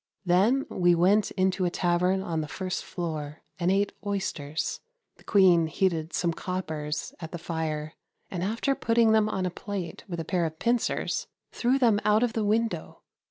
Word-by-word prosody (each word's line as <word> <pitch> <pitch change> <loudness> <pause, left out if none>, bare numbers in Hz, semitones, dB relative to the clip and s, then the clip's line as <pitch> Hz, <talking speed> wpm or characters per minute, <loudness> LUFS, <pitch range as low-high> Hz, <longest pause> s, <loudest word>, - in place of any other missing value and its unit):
Then 200 +10 +3
we 175 -1 +3
went 195 +5 +3
into 185 0 0
a 180 - +2
tavern 180 +2 +1
on 165 -3 -2
the 155 - -4
first 185 +3 -4
floor, 155 -4 -5 0.2
and 175 0 +1
ate 200 +1 +2
oysters. 180 -7 -2 0.4
The - - -20
Queen 180 -5 +5
heated 165 -1 0
some 170 -2 0
coppers 155 -5 -4
at 160 -2 -7
the 175 - -4
fire, 160 -2 -3 0.4
and, 180 - -3
after 225 +8 0
putting 230 -4 +3
them 215 -1 +4
on 190 -3 -1
a 180 - -1
plate 195 -2 -6
with 170 -3 -5
a 165 - -3
pair 175 -1 +1
of 160 0 -9
pincers, 235 +5 0 0.2
threw 250 +3 +1
them 230 -6 +4
out 215 +2 +4
of 240 -2 0
the 225 - 0
window. 220 +2 -1
185 Hz, 175 wpm, -27 LUFS, 165-210 Hz, 0.4 s, Queen